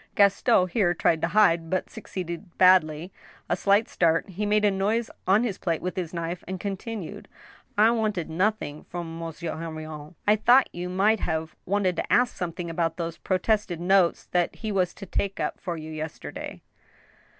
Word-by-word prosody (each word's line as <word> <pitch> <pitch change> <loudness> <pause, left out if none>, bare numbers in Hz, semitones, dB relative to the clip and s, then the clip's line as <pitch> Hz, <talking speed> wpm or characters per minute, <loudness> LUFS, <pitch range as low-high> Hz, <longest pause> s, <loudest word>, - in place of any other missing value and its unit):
Gaston 195 -2 +4
here 175 -4 +2
tried 160 -1 +2
to - - +2
hide 170 -4 +3
(but 185 +1 -1
succeeded 180 -4 -7
badly) 180 -2 +4 0.4
a - - +1
slight 200 +3 +3
start; 165 +4 +1
he 205 +3 -3
made 210 0 +3
a 205 - +4
noise 210 +4 0 0.2
on 200 +5 +4
his 215 -6 -2
plate 165 -3 -1
with 180 0 -4
his 175 -4 -3
knife, 170 0 -4
and 190 0 -4
continued: 200 0 -5 0.5
I 220 +2 +6
wanted 215 -7 -1
nothing 165 -3 -1
from 165 -1 -6
Monsieur 165 0 -5
Henrion." 155 -1 -7
"I 210 +1 +5
thought 245 +5 +5
you 175 +1 -4
might 200 +4 +3
have 160 -2 -2
wanted 190 -2 +1
to - - -3
ask 245 0 +3
something 175 0 -4
about 165 -1 -1
those 165 -1 -4
protested 190 -2 0
notes 180 0 +3
that 175 -1 +1
he 220 -1 -4
was 185 -3 0
to 195 - -8
take 195 +1 -2
up - - -2
for 175 -3 -3
you 155 0 -7
yesterday." 155 0 -7
180 Hz, 175 wpm, -26 LUFS, 165-205 Hz, 0.5 s, I